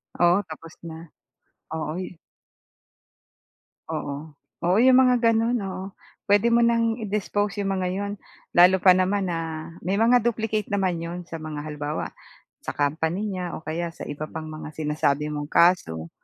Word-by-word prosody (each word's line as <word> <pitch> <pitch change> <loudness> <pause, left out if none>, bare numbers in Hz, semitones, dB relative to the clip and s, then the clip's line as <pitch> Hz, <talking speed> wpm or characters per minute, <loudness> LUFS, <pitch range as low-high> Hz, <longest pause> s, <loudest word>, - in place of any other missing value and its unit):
Oo, 175 +2 +4
tapos 165 +1 -10
na. 160 0 -10 0.7
Oo, 155 +1 -3
eh. 185 -1 -7 1.7
Oo. 145 +2 -5 0.3
Oo, 180 +3 +4
'yong 255 0 +7
mga 255 -1 +5 0.2
gano'n, 230 +2 +2
oo. 190 -1 -5 0.4
Puwede 205 +4 +4
mo 235 - +5
nang 230 0 +2
i-dispose 205 -1 -1
'yong 195 - -1
mga 185 -1 -1
'yon. 200 +1 -3 0.4
Lalo 180 +1 +6
pa 185 - +9
naman 185 +1 +2
na 165 -1 -4
may 190 +3 -1
mga 230 +4 +5
duplicate 220 -2 -1
naman 190 -4 0
'yon 170 +1 -5
sa 165 -1 -8
mga 155 -2 -6
halimbawa, 150 0 -4 0.5
sa - - -6
company 160 +8 0
niya 180 -1 -4
o - - -9
kaya 170 +2 -2
sa - - -7
iba 150 +1 -5
pang 155 0 -7
mga 155 0 -8
sinasabi 150 -1 0
mong 145 -1 -4
kaso. 85 - +3
175 Hz, 155 wpm, -25 LUFS, 155-205 Hz, 1.7 s, pa